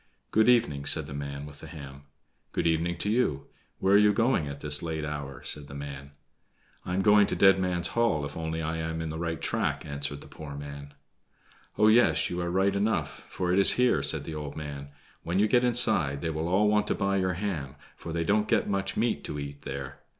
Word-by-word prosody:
"Good 110 +2 +4
evening," 75 -13 +2
said 80 -3 +4
the 70 - -8
man 70 0 -5
with 75 -1 -12
the - - -10
ham. 70 -3 -10 0.5
"Good - - -1
evening 85 +1 +1
to 105 - -2
you. 110 - 0 0.3
Where 95 +1 +2
are 100 - +7
you 105 0 +4
going 115 - +1
at 70 0 -7
this 75 -1 +3
late 80 -2 -3
hour?" 70 -3 -6
said 75 -1 0
the 70 - -10
man. 70 0 -8 0.7
"I 90 - -3
am 95 - +1
going 105 0 +5
to - - -1
Dead 95 -1 +5
Man's 90 -3 0
Hall, 115 -11 +1
if - - -8
only 80 0 -3
I 80 +1 -2
am 80 0 -3
in 80 -1 -4
the 80 - -5
right 85 -1 -3
track," 85 -11 -2
answered 70 0 -4
the - - -13
poor 75 -2 -9
man. 70 0 -9 0.8
"Oh, 105 - +5
yes, 110 -8 +4
you 90 0 -2
are 85 - -2
right 95 +2 +1
enough, 105 +3 -2
for 90 -1 -1
it 95 - +3
is 100 - +8
here," 125 - +2
said 70 - 0
the 80 - -7
old 75 -2 -6
man. 70 -2 -6 0.3
"When 85 +2 -2
you 105 +2 +4
get 120 +3 +3
inside 110 - +3
they 80 - -2
will 80 +1 -3
all 95 +4 +3
want 105 0 +2
to - - 0
buy 100 0 0
your 95 -1 0
ham, 80 -8 -4 0.2
for 85 - -8
they 85 0 -1
don't 105 +4 +1
get 110 -2 +1
much 100 -1 -2
meat 110 -10 0
to 75 - -5
eat 70 0 -7
there. 70 -1 -7
80 Hz, 230 wpm, -28 LUFS, 70-100 Hz, 0.8 s, is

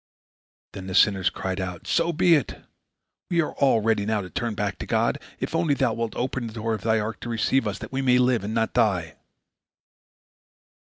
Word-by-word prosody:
Then 95 -1 -8
the 95 - -4
sinners 95 -3 +4
cried 95 0 -4
out: 90 -2 -6
"So 170 0 +1
be 170 +2 +4
it! 150 -4 0 0.7
We 170 -2 +2
all 140 -4 +2
are - - -7
ready 110 -2 +2
now 105 0 0
to 90 - -9
turn 115 -3 -2
back 100 -2 -3
to - - -6
God, - - +1 0.2
if - - -4
only 165 -3 +2
thou 130 -4 +1
wilt 115 -1 -3
open 125 -1 -2
the 110 - -9
door 115 0 -2
of 110 - -4
thy 110 0 +2
ark 110 +1 -4
to 120 - -7
receive 115 +1 +1
us, 100 -1 -3
that - - -9
we 135 0 -1
may 125 -2 +4
live 125 -3 +2
and 105 +2 -3
not 115 -1 0
die." 85 -8 +1
115 Hz, 210 wpm, -25 LUFS, 100-130 Hz, 0.7 s, sinners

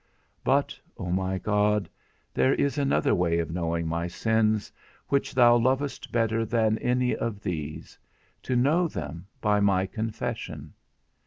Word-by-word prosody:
But, - - +1 0.2
O 90 - -4
my 95 +1 0
God, 105 +1 +1 0.5
there 130 - +3
is 140 +1 0
another 140 -1 +2
way 85 -1 +2
of 85 -1 -2
knowing 85 -1 -1
my 85 +1 -1
sins, 110 +2 +1 0.4
which 140 -2 0
thou 120 -2 +6
lovest 130 +4 -1
better 115 -1 +1
than 110 -1 +1
any 125 0 +1
of 110 -3 -3
these; 80 -7 -5 0.4
to 130 - -2
know 150 +8 +3
them 80 - -6
by 105 -1 +3
my 100 -2 +3
confession. 110 +2 -5
105 Hz, 140 wpm, -27 LUFS, 90-120 Hz, 0.5 s, thou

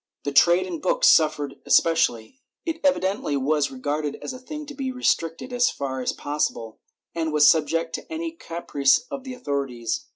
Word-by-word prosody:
The 145 - -2
trade 175 +5 +5
in 185 - -5
books - - +2
suffered 150 -3 +2
especially. 165 - +2 0.2
It 325 -1 -3
evidently 195 - +1
was 145 +1 +1
re 135 - -10
garded 145 +2 -2
as - - -6
a 255 - -9
thing 300 +4 -7
to 290 - -9
be 270 -2 -3
restricted 250 -3 -1
as 245 0 +3
far 130 -2 -4
as 125 - 0
possible, 130 -6 -3 0.3
and 160 -1 -2
was 150 -1 +5
subject 165 +1 +2
to - - -6
any 325 +1 -3
caprice 165 - +1
of 275 -1 -6
the 260 -1 -6
authorities. 135 - -3
165 Hz, 175 wpm, -24 LUFS, -, 0.3 s, trade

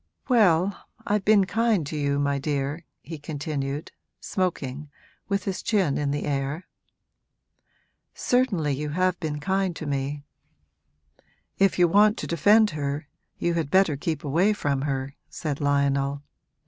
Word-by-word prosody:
'Well, 195 -6 +4 0.3
I've 205 -1 +1
been 205 -2 +5
kind 220 -4 +1
to 150 - -5
you, 140 -1 0
my 140 0 0
dear,' 145 +2 -2 0.2
he 160 -2 -7
continued, 145 -1 -4 0.3
smoking, 150 -6 -3 0.4
with 200 -1 0
his 195 -2 -3
chin 190 -10 +1
in 145 -1 0
the 145 +1 -2
air. 140 +4 -2 1.5
'Certainly 205 - +1
you 150 +2 -3
have 185 +3 0
been 150 -3 -3
kind 190 +2 0
to 160 - -6
me.' 140 0 -2 1.4
'If 195 -1 +3
you 175 -1 +5
want 210 +5 +4
to - - -4
defend 210 +5 +4
her 145 -1 -3 0.3
you 170 - 0
had 165 -4 -1
better 185 -3 +4
keep 155 +1 -3
away 170 +9 +2
from 140 -9 -1
her,' 135 0 -3 0.2
said 150 -3 -4
Lionel. 140 0 +1
155 Hz, 140 wpm, -25 LUFS, 140-190 Hz, 1.5 s, been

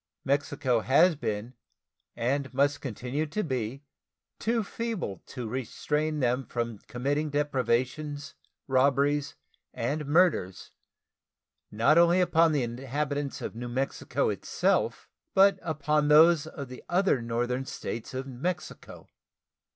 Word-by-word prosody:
Mexico 140 -3 +1
has 155 +9 +4
been 110 -3 -4 0.6
and 130 +2 -1
must 140 +1 +2
continue 130 +4 -3
to 210 +8 -2
be 130 -2 -3 0.6
too 230 0 0
feeble 210 - -4
to 125 -4 -6
restrain 150 +5 -2
them 125 +1 +1
from 115 -4 -4
committing 145 +5 -1
depredations, 145 +1 -1 0.3
robberies, 140 +2 +2 0.4
and 145 +5 -2
murders, 150 - +2 1.0
not 115 +10 +4
only 170 +1 +5
upon 165 -2 +4
the 145 -4 +1
inhabitants 140 +4 -3
of - - -4
New 120 +2 -6
Mexico 130 +3 -1
itself, - - 0 0.3
but 195 +1 +6
upon 150 -1 0
those 155 +1 +6
of 140 -3 -7
the 125 0 -10
other 180 -7 +2
northern 120 +2 -1
States 115 +2 -6
of 130 +1 -3
Mexico. 140 +7 -5
140 Hz, 115 wpm, -28 LUFS, 125-155 Hz, 1.0 s, but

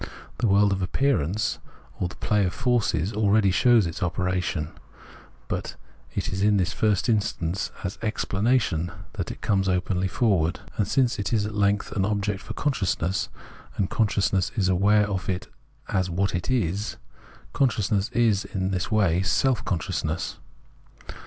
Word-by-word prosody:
The 120 - +2
world 100 0 +4
of 95 -1 -1
appearance, 100 - 0 0.4
or 90 - 0
the 95 - -10
play 105 -1 +1
of 90 - -1
forces, 110 -8 +1
aheady 105 -2 +3
shows 120 -1 +5
its 85 -1 -5
operation; 90 -3 -1 0.8
but - - -4 0.4
it - - -1
is 95 - -2
in 105 0 +4
the 95 - +3
first 105 +4 +1
instance 100 -5 0
as 95 0 -4
Explanation 105 -5 0 0.2
that - - -4
it - - -8
comes 95 -2 +1
openly 90 +1 0
forward. 95 -5 +1 0.2
And 105 - 0
since 130 -5 +1
it 100 - -2
is 105 -3 +2
at 105 - -4
length 100 0 +1
an 95 - 0
object 100 0 -1
for - - -8
consciousness, 100 - 0 0.5
and 95 -1 -1
conscious 105 -3 +1
ness 95 -1 +1
is 95 -5 +1
aware 105 +3 +4
of 95 -2 -3
it 90 -1 -2 0.4
as 95 -3 0
what 95 +3 0
it 85 +5 -2
is, 105 -4 -1 0.6
consciousness 105 -5 +1
is 115 -5 +2
in 95 0 -3
this 90 -2 -2
way 95 -6 +2
Self 120 +5 +1
consciousness. 85 -5 -2
100 Hz, 155 wpm, -25 LUFS, 90-110 Hz, 0.8 s, shows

